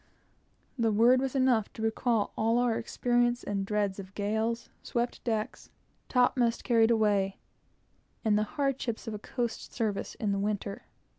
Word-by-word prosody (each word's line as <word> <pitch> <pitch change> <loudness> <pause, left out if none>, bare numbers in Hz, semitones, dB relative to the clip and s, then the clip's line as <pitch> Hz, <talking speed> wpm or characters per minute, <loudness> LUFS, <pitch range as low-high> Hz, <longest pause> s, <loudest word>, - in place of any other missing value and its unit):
That 225 -2 +2
word 240 +4 +5
was 270 0 -2
enough 255 -5 +2
to 220 - -6
recall 225 -1 0
all 225 +2 +2
our 245 -2 +2
experiences 240 +1 +1
and 200 -1 -2
dreads 205 -2 0
of 195 0 -10
gales, 220 +3 -1
swept 240 0 -2
decks, 220 -3 -3 0.4
topmast 245 -2 +2
carried 230 -2 +4
away, 205 -4 +2 0.9
and 215 -1 +4
the 210 - +3 0.2
hardships 270 -6 -1
of 225 - -3
a 210 - -5
coast 235 +1 -4
service 215 -4 -2
in 210 -2 -1
the 200 - 0
winter. 200 -1 -3
225 Hz, 150 wpm, -29 LUFS, 210-240 Hz, 0.9 s, word